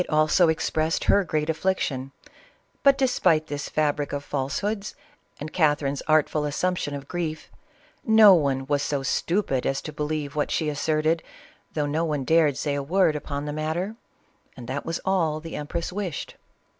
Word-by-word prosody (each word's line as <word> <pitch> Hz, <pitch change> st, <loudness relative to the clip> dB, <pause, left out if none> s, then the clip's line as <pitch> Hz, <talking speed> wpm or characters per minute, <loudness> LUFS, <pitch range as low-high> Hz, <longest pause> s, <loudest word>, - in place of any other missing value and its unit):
also 155 Hz, +2 st, +4 dB
expressed 160 Hz, 0 st, 0 dB
her 200 Hz, -, +4 dB
great 155 Hz, -3 st, -1 dB
affliction, 155 Hz, -6 st, -1 dB, 0.7 s
but, 275 Hz, -1 st, +5 dB
despite 205 Hz, -, +2 dB
this 145 Hz, -2 st, -5 dB
fab 150 Hz, -1 st, +1 dB
ric 145 Hz, -, -3 dB
of 145 Hz, 0 st, -3 dB
falsehoods 185 Hz, +11 st, -3 dB, 0.4 s
and 155 Hz, +1 st, -7 dB
Catherine's 145 Hz, -4 st, +1 dB
artful 155 Hz, -1 st, +2 dB
assumption 150 Hz, 0 st, -1 dB
of 140 Hz, 0 st, -8 dB
<rrief, 165 Hz, -3 st, -4 dB, 0.5 s
no 220 Hz, -3 st, +8 dB
one 140 Hz, -5 st, +1 dB
was 145 Hz, 0 st, 0 dB
so 140 Hz, -1 st, -1 dB
stupid 150 Hz, -2 st, 0 dB
as 135 Hz, -, 0 dB
to 155 Hz, -, -7 dB
believe 150 Hz, -1 st, -3 dB
what 150 Hz, -, 0 dB
she 155 Hz, -2 st, 0 dB
as 145 Hz, -, -5 dB
^fe 155 Hz, 0 st, 0 dB
serted, 160 Hz, +1 st, +2 dB, 0.5 s
though 150 Hz, -2 st, 0 dB
no^ne 150 Hz, -2 st, -1 dB
dared 155 Hz, -3 st, +3 dB
say 145 Hz, -1 st, -1 dB
a 140 Hz, -, -1 dB
word 170 Hz, +2 st, +2 dB
upon 145 Hz, -1 st, -4 dB
the 150 Hz, -, -4 dB
mat 155 Hz, +1 st, -2 dB
ter, 190 Hz, +5 st, -3 dB, 0.6 s
and 120 Hz, -2 st, -9 dB
that 135 Hz, +4 st, -4 dB
was 165 Hz, 0 st, -2 dB
all 165 Hz, -5 st, +1 dB
the 165 Hz, +1 st, -8 dB
empress 165 Hz, +4 st, -4 dB
wished. 190 Hz, -6 st, -4 dB
155 Hz, 170 wpm, -25 LUFS, 145-170 Hz, 0.7 s, no